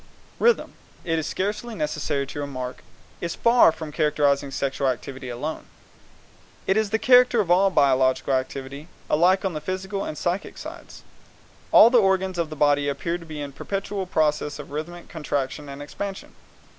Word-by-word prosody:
Rhythm, 475 0 +2 0.3
it 165 -2 0
is 160 - -3
scarcely 210 +4 -3
necessary 150 -4 -2
to 140 - -7
remark, 130 -3 -5 0.4
is 170 -1 -3
far 235 -5 +5
from 160 -1 -8
characterizing 145 -2 +1
sexual 135 0 -1
activity 130 +1 -4
alone. 140 +6 -5 1.0
It 190 - +2
is 220 -1 +1
the 220 - +1
character 250 0 +5
of 185 -5 +1
all 190 +2 +5
biological 135 -5 +2
activity, 135 +3 -3 0.2
alike 185 +5 +3
on 190 - -1
the 155 - -4
physical 190 +4 -3
and 155 - -5
the - - -7
psychic 180 +3 -2
sides. - - -10 0.7
All 230 - +8
the 245 -3 +6
organs 190 -2 +1
of 165 -2 -1
the 155 - -7
body 145 -1 +2
appear 170 +5 -2
to 165 - -12
be 155 -2 -6
in 140 -1 -5
a - - -22
perpetual 195 +4 -4
process 150 -3 0
of 145 -1 -10
rhythmic 170 +4 -6
contraction 145 -2 -3
and 140 +1 -7
expansion. 195 +6 -6
155 Hz, 170 wpm, -24 LUFS, 140-190 Hz, 1.0 s, All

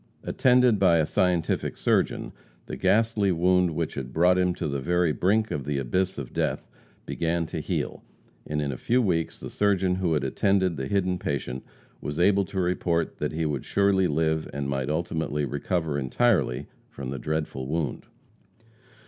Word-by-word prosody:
Attended 125 -4 +3
by 85 -4 +5
a 80 - +3
scientific 90 0 0
surgeon, - - 0 0.3
the - - -6
ghastly 110 -2 +2
wound 90 -1 +2
which 85 -1 -2
had 65 -2 -5
brought 90 +4 +4
him 90 -1 +1
to - - -3
the 70 -1 -2
very 85 +4 +1
brink 105 +7 +1
of 70 - -2
the 70 +1 -2
abyss 90 +9 -1
of 70 -4 -6
death, - - -1 0.4
began 85 0 -1
to - - -5
heal, - - -3 0.4
and 75 0 -1
in 70 - -2
a 60 - -6
few 125 +2 +2
weeks 85 -8 0
the - - -7
surgeon 95 -3 +2
who 90 -3 0
had 75 - 0
attended 95 -3 +1
the 65 -3 -4
hidden 90 -1 0
patient 65 -4 -3 0.4
was 75 +2 -4
able 100 +2 +4
to 95 +2 -4
report 85 -2 0
that - - -1
he 80 +1 -1
would 75 -4 -2
surely 100 -2 +2
live 80 0 0
and 70 -1 -3
might 70 -1 -2
ultimately 80 -2 -1
recover 75 +2 -1
entirely 70 - +1 0.2
from 65 -1 -6
the 70 - -4
dreadful 75 -4 -3
wound. 75 -2 -3
85 Hz, 175 wpm, -26 LUFS, 75-95 Hz, 0.4 s, by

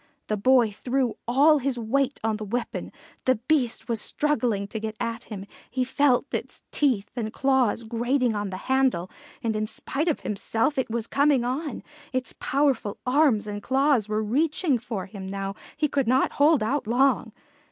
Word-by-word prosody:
The 215 - +1
boy 240 +1 +4
threw 250 +3 -1
all 290 +5 +5
his 270 -1 -1
weight 265 +4 0
on 220 -1 0
the 215 - -6
weapon; 235 +4 -3 0.3
the 255 - +4
Beast 250 +1 0
was 230 -3 +1
struggling 240 -9 0
to 220 - -4
get 220 0 -4
at 230 -1 -3
him; 200 -3 -7 0.2
he 255 0 0
felt 260 -1 +2
its - - -4
teeth 250 -9 +1
and 220 -3 -3
claws 260 -3 +1
grating 240 +2 0
on 205 -1 -2
the 185 - -5
handle, 260 -9 +1 0.3
and 225 -2 0
in 215 0 -1
spite 290 +8 -2
of 320 - 0
himself 225 +7 0
it 260 - -1
was 230 -1 -2
coming 280 -1 +3
on; 270 +5 -3 0.3
its 255 0 -2
powerful 270 -7 0
arms 255 -5 +3
and 205 -1 -5
claws 265 -3 +2
were 215 0 0
reaching 290 - +1
for 220 -5 -5
him 195 -1 -8
now; 195 0 -4 0.2
he 305 0 +2
could 275 -4 0
not 255 +3 +3
hold 290 -4 +4
out 260 +1 -1
long. 260 +4 +2
245 Hz, 175 wpm, -25 LUFS, 215-275 Hz, 0.3 s, all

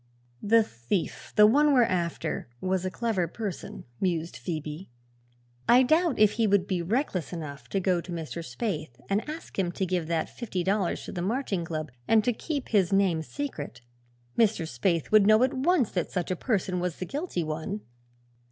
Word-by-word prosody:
"The 225 +2 +5
thief 120 - -3
the 210 - +8
one 290 +7 +5
we're 250 - +6
after 175 - -2
was 185 0 -1
a - - 0
clever 195 -3 -1
person," 200 +1 -6
mused 170 -3 -1
Phoebe. 155 0 -5 0.8
"I 250 +2 +8
doubt 315 +2 +3
if 210 -1 +6
he 225 0 +1
would 200 -2 +3
be 185 -3 -1
reckless 190 - -1
enough 145 -7 -7
to 195 - 0
go 180 -2 +1
to 180 - -9
Mr. 165 0 -5
Spaythe 155 - -4
and 200 +2 +3
ask 315 -8 -7
him 180 -2 +1
to 190 - -1
give 180 -3 -1
that 165 -1 0
fifty 195 -7 -4
dollars 195 0 0
to - - -6
the 175 - -4
Marching 205 -2 -1
Club 155 -3 -4 0.2
and 220 -1 +5
to 245 - +2
keep 285 +3 -4
his 195 -5 +3
name 195 -5 +3
secret. 155 - -5 0.5
Mr. 220 -6 +3
Spaythe 160 +6 0
would 215 -2 +6
know 215 +3 +6
at 260 - +2
once 275 - +2
that 180 - -1
such 180 0 -2
a - - +1
person 185 -3 -1
was 180 -2 -2
the 185 - -4
guilty 280 - -3
one. 160 +7 -4
190 Hz, 185 wpm, -28 LUFS, 170-225 Hz, 0.8 s, the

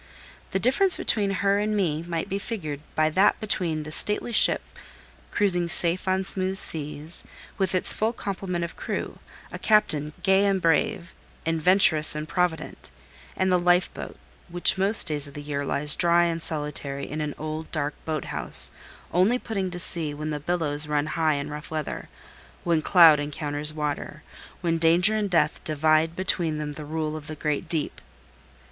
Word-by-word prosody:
The - - -2
difference 270 - +3
between 205 -3 0
her 195 +1 0
and 210 0 -1
me 160 -6 -1
might 170 -1 -4
be 195 - -3
figured 170 - -5 0.2
by 155 0 +1
that 190 +6 +2
between 170 -7 -2
the 155 - -9
stately 210 +8 0
ship 225 - +5 0.7
cruising 180 -4 +1
safe 170 +3 0
on 190 0 0
smooth 190 0 -1
seas, 150 -1 -5 0.4
with 190 -1 0
its 185 - +4
full 220 +1 -1
complement 190 -5 -5
of 170 - -10
crew, - - -5 0.3
a - - -8
captain 155 -9 +1
gay 195 0 +3
and 195 -1 +1
brave, 170 +1 0 0.3
and 165 0 -1
venturous 160 -4 +5
and 150 0 -5
provident; 180 -2 -3 0.5
and 185 0 0
the 180 - +3
life 175 +1 +1
boat, - - -9 0.3
which 175 +1 +4
most 195 +3 +5
days 150 -2 -1
of 140 - -14
the 145 - -7
year 145 -1 -4
lies 150 +1 +2
dry 170 0 +3
and 165 -1 -2
solitary 145 -3 -3
in 155 +2 -5
an 150 -1 -4
old, 155 +1 -6
dark 145 -2 -3
boat 155 -3 -4
house, - - +6 0.4
only 190 +8 +2
putting 200 -6 -4
to 180 - -7
sea 160 -4 -1
when 155 +1 -5
the 150 - -4
billows 150 -2 0
run 150 -1 -1
high 160 -2 +1
in 140 +1 -5
rough 150 +1 -8
weather, 155 -2 -6 0.5
when 170 -2 +1
cloud 165 -3 +6
encounters 145 0 -2
water, 150 0 -5 0.4
when 165 -2 -1
danger 175 +6 +4
and 210 -2 -2
death 165 -4 0
divide 155 +1 +1
between 175 -4 -1
them 150 -1 -5
the 150 +1 -9
rule 155 0 -4
of 155 -1 -9
the 155 - -6
great 150 +2 -3
deep. 160 -4 -2
165 Hz, 175 wpm, -24 LUFS, 150-185 Hz, 0.7 s, house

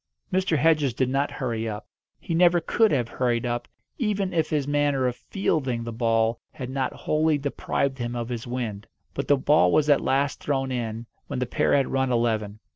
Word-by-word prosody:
Mr. 185 -4 +2
Hedges 150 -5 +3
did 130 0 +1
not 135 +2 +1
hurry 115 -4 -3
up; 105 +1 -6 0.3
he 170 - -4
never 175 +1 +5
could 220 +6 +2
have 125 -5 +1
hurried 120 0 -1
up, 120 0 -2 0.3
even 205 -5 0
if 160 -2 +1
his 145 -3 0
manner 145 -2 +1
of 125 -1 0
"fielding" 135 - -1
the 115 - -5
ball 115 0 +1
had 130 -4 -6
not 135 -1 -1
wholly 155 0 +1
deprived 140 -1 -2
him 120 0 -3
of 120 0 -3
his 120 -1 -5
wind. 115 -4 -4 0.3
But 140 - -3
the 145 - +4
ball 150 +3 +4
was 150 -1 +3
at 145 - +4
last 140 +1 0
thrown 135 -2 -1
in 115 -2 -3 0.2
when - - -4
the 125 - 0
pair 125 - +1
had 135 -2 +2
run 130 -1 +1
eleven. 110 -3 0
130 Hz, 200 wpm, -25 LUFS, 120-150 Hz, 0.3 s, never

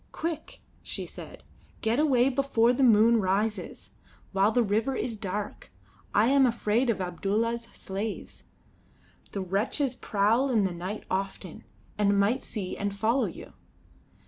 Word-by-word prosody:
"Quick," 320 -1 -5 0.2
she - - -5
said; - - -10 0.4
"get 225 +4 +1
away 270 -4 +4
before 250 -3 +2
the 260 - -1
moon 230 -1 +6
rises, 210 +2 -1 0.4
while 195 +2 +3
the 240 +1 +3
river 225 +5 0
is 230 - -2
dark. 205 0 -5 0.4
I 210 - +4
am 270 +1 +5
afraid 235 +1 +1
of 220 - +1
Abdulla's 210 +6 -1
slaves. 200 +3 -6 0.9
The 200 - -3
wretches 215 - -1
prowl 230 +3 +1
in 225 -5 +3
the 190 -2 0
night 185 +5 -5
often, 190 -2 -4 0.3
and 200 -1 +3
might 225 +7 +2
see 195 -5 -5
and 200 0 -3
follow 230 +6 +2
you. - - -8
220 Hz, 140 wpm, -28 LUFS, 200-245 Hz, 0.9 s, moon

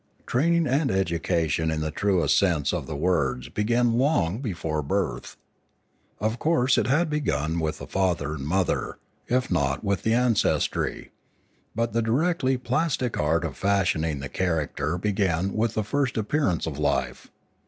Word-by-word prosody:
Training 170 +6 +2
and 135 +2 +1
education 85 -3 0
in 80 -1 -1
the 80 0 -2
truest 90 -4 +2
sense 80 -8 +2
of - - -3
the 80 - -5
words 70 -6 0
began 120 +2 +1
long 110 - +1
before 85 - -3
birth. 70 - -2 0.8
Of 110 +3 -1
course 135 -5 +2
it - - 0
had 150 +6 +2
begun 85 - -1
with 80 -1 -2
the - - -8
father 85 -6 0
and 70 -3 -6
mother, 90 +4 -1 0.3
if 125 +1 0
not 70 +3 0
with 100 -2 0
the 110 +1 +2
ancestry; 120 -3 0 0.6
but 115 +1 -1
the 115 - +2
directly 130 +3 +1
plastic 130 -2 -1
art 80 +3 +1
of 75 - -5
fashioning 85 -7 0
the 70 - -4
character 80 -2 -1
began 95 -2 0
with 110 +1 0
the 110 - 0
first 135 +3 -1
appearance 110 - 0
of - - -5
life. - - -1
95 Hz, 155 wpm, -25 LUFS, 80-125 Hz, 0.8 s, Training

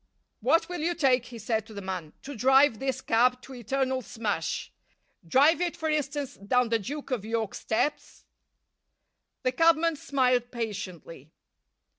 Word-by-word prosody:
"What 285 +9 +3
will 355 -1 -5
you 340 +3 0
take," 260 -6 +3
he 240 - -9
said 220 0 -2
to 220 - -12
the - - -5
man, 180 -5 -5
"to 285 0 -7
drive 265 0 +4
this 265 0 -2
cab 250 +2 +3
to 265 - -11
eternal 260 +2 -1
smash? 205 -8 -3 0.6
Drive 290 - +4
it, 350 -1 -1
for 320 - -2
instance, 290 -2 -2
down 245 +4 +1
the 230 0 +2
Duke 280 +7 -6
of 240 -6 -1
York's 225 -1 -2
steps?" 290 +7 -2 1.2
The 255 - +2
cabman 330 +2 +3
smiled 250 -4 +1
patiently. 185 - -6
250 Hz, 150 wpm, -28 LUFS, 220-285 Hz, 1.2 s, drive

